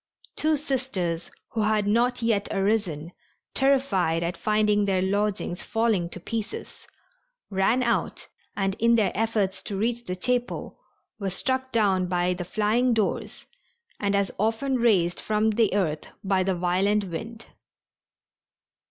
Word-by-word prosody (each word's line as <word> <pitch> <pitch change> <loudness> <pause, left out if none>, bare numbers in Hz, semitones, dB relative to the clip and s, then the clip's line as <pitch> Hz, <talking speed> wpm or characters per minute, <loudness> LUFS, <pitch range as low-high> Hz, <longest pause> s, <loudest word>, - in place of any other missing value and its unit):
Two 310 0 +2
Sisters 245 - -2 0.2
who 225 - -2
had 215 -1 +2
not 235 +4 +2
yet 215 -3 +1
arisen, 195 -6 0 0.4
terrified 210 -12 +2
at 170 +2 -2
finding 210 -1 +2
their 190 -2 +1
lodgings 200 -2 -1
falling 225 -7 0
to 180 - -6
pieces, 230 - -6 0.6
ran 200 +6 +2
out 235 -1 -1 0.3
and 195 -1 +1
in 235 +1 +4
their 220 -3 +2
efforts 215 -3 0
to 200 - -5
reach 235 +3 -1
the 180 - -3
chapel 245 +5 -2 0.4
were 200 -2 -1
struck 260 +7 -1
down 195 -5 +2
by 180 0 +1
the 180 0 -4
flying 225 +6 +2
doors 215 -3 -2 0.5
and 200 -1 +1
as 200 -1 +1
often 225 +5 +1
raised 195 -8 +2
from 215 +1 +1
the 220 -1 +2
earth 155 -7 -1 0.2
by 195 -1 +2
the 185 0 +1
violent 190 +4 +1
wind. 225 +6 -7
210 Hz, 135 wpm, -26 LUFS, 190-230 Hz, 0.6 s, in